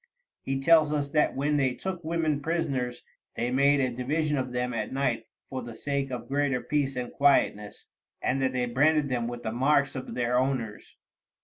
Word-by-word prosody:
He 135 0 -2
tells 155 +1 +5
us 145 -2 -1
that 150 0 +2
when 145 +2 +1
they 130 -3 +1
took 185 -2 -5
women 160 -3 0
prisoners, 140 -7 -2 0.3
they 120 +1 -1
made 140 +2 +4
a 130 -2 +1
division 150 +4 0
of 130 -2 -2
them 125 0 -2
at 110 -2 -3
night 130 -4 -1 0.2
for 130 -1 -5
the 120 -1 -8
sake 140 +1 -2
of 125 -1 -5
greater 140 -2 +1
peace 140 -1 -1
and 125 -1 -4
quietness, 120 -7 +2 0.3
and 135 +1 0
that 130 -1 +2
they 125 -1 0
branded 145 +4 +2
them 120 -2 -1
with 120 0 -6
the 110 - -2
marks 140 +3 +2
of 130 - -6
their 125 0 +1
owners. 125 -5 -3
135 Hz, 190 wpm, -28 LUFS, 125-145 Hz, 0.3 s, tells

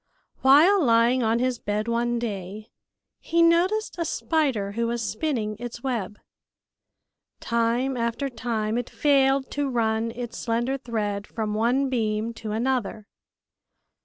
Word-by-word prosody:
While 315 +8 +6
lying 235 +1 +4
on 225 0 +2
his 250 0 0
bed 210 +2 -2
one 240 +1 0
day, 210 -2 -5 0.5
he 335 0 +2
noticed 360 +5 +2
a - - +1
spider 280 -11 0
who 230 +3 -1
was 235 0 -2
spinning 220 -5 -2
its 240 0 -7
web. 225 -6 -3 1.2
Time 235 +3 0
after 235 +3 -1
time 230 -2 -2
it 245 - -5
failed 275 -2 +2
to 285 -1 -1
run 225 -2 0
its 235 0 -6
slender 240 +3 -1
thread 210 -5 -3
from 215 -2 -3
one 240 +6 +1
beam 225 -2 -1
to 220 -1 -6
another. 225 -2 -1
235 Hz, 130 wpm, -25 LUFS, 220-265 Hz, 1.2 s, While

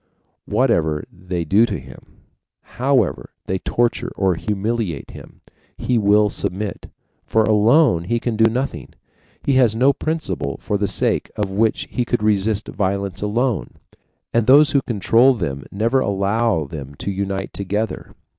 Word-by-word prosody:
Whatever 85 - +1
they 90 -1 -4
do 105 +8 +4
to - - -3
him, - - -15 0.4
however 125 - 0 0.2
they 95 0 -2
torture 120 +4 -1
or 95 -2 +2
humiliate 105 - -3
him, - - -13 0.4
he 125 -2 0
will 105 0 +4
submit, 100 0 -4 0.3
for, 110 - +2
alone, 110 - +4
he 120 +4 0
can 115 -1 -2
do 110 +1 +4
nothing; 130 +4 -4 0.5
he 140 - +1
has 120 -4 +4
no 130 +4 +4
principle 155 - -3
for 105 - -3
the 100 - +1
sake - - 0
of 105 -2 -2
which 110 +3 0
he 125 - 0
could 120 -2 -1
resist 105 0 +1
violence 100 -1 -2
alone. 115 +2 -1 0.6
And 115 -2 +2
those 145 +3 +7
who 140 - +3
control 120 +3 +3
them 70 - -4
never 115 +6 +1
allow 100 - 0
them 70 -2 -8
to 100 - -4
unite 95 0 -3
together. 100 +1 -4
105 Hz, 145 wpm, -20 LUFS, 95-120 Hz, 0.6 s, those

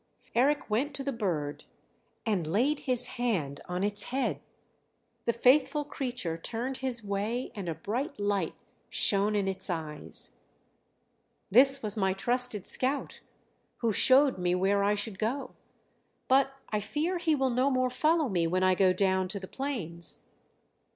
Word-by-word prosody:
Eric 285 +5 +2
went 265 +7 -1
to 275 - -4
the 275 - -2
bird 170 - -3 0.6
and 195 -8 0
laid 255 - +1
his 250 -1 +2
hand 195 - -2
on 180 +1 -2
its 205 0 0
head; 265 +1 -2 0.8
the 235 - +3
faithful 270 +5 +3
creature 245 - -3
turned 240 +9 -3
his 255 -4 -2
way 210 +5 -2
and 200 -6 -5
a 165 - -3
bright 235 - -4
light 205 -4 -1 0.3
shone 205 +1 +3
in 200 -2 0
its 190 0 -3
eyes. 155 -3 -2 1.2
"This 270 +4 +7
was 210 0 +1
my 190 -2 +2
trusted 240 0 0
scout, 270 +2 -2 0.6
who 230 -3 +1
showed 265 0 +5
me 180 0 +1
where 195 +2 +2
I 205 +1 +2
should 205 -1 -3
go; 245 +6 -2 0.7
but 270 +1 +3
I 210 - 0
fear 305 - -2
he 325 -3 +2
will 265 -2 +1
no 255 +3 +2
more 255 -1 +1
follow 310 +4 +2
me 175 -6 0
when 185 +2 0
I 185 0 +4
go 185 0 +3
down 190 -1 +1
to 200 +2 -4
the 190 - -8
plains. 185 - -4
220 Hz, 155 wpm, -29 LUFS, 190-265 Hz, 1.2 s, This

